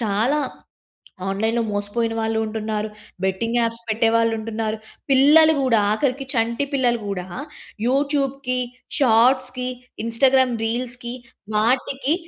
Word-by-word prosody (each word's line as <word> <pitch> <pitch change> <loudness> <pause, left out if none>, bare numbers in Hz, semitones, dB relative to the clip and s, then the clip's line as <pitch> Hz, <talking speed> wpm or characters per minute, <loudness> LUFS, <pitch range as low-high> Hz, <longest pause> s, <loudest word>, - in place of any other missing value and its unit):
చాలా 225 +6 +1 0.9
ఆన్‌లైన్‌లో 220 +4 0
మోసపోయిన 205 +3 -1
వాళ్ళు 220 0 0
ఉంటున్నారు. 215 0 -3 0.4
బెట్టింగ్ 225 +5 -1
యాప్స్ 230 0 -2
పెట్టేవాళ్ళు 230 +1 +2
ఉంటున్నారు. 220 0 -3 0.3
పిల్లలు 300 +4 +6
కూడా, 235 -5 +3
ఆఖరికి 270 +3 -1
చంటి 235 +3 0
పిల్లలు 245 -3 +2
కూడా 185 -3 -4 0.6
యూట్యూబ్‌కి, 275 -1 0 0.4
షార్ట్స్‌కి, 255 0 +3 0.4
ఇన్స్టాగ్రామ్ 255 +2 +3
రీల్స్‌కి 240 +1 -2 0.4
వాటికి 260 +5 +1
235 Hz, 100 wpm, -22 LUFS, 220-260 Hz, 0.9 s, పిల్లలు